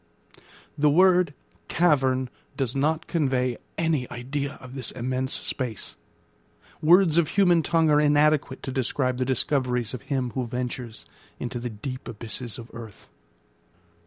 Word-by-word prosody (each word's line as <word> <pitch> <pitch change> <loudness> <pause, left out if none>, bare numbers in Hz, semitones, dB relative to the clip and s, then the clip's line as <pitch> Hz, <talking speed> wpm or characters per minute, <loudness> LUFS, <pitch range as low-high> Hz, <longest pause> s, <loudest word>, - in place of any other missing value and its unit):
The 150 0 +5
word 180 -1 +4 0.3
cavern 130 -6 +2 0.3
does 130 -3 -1
not 155 +3 +1
convey 130 -6 0 0.2
any 160 -6 0
idea 140 +3 -3
of 130 0 -12
this 130 -3 -2
immense 130 +1 -2
space; 120 -6 -3 0.9
words 170 0 +5
of 170 -3 +4
human 175 -1 +4
tongue 160 -1 +2
are 150 0 +5
inadequate 150 -2 +2
to 135 - -3
describe 130 0 0
the 130 - +1
discoveries 125 -2 0
of 125 - -5
him 130 -3 -2
who 125 +2 -2
ventures 125 -1 -5 0.3
into 120 0 -4
the 120 +1 -4
deep 125 +4 -7
abysses 115 +1 -5
of 115 -1 -10
earth. 115 -3 -11
130 Hz, 135 wpm, -26 LUFS, 125-150 Hz, 0.9 s, The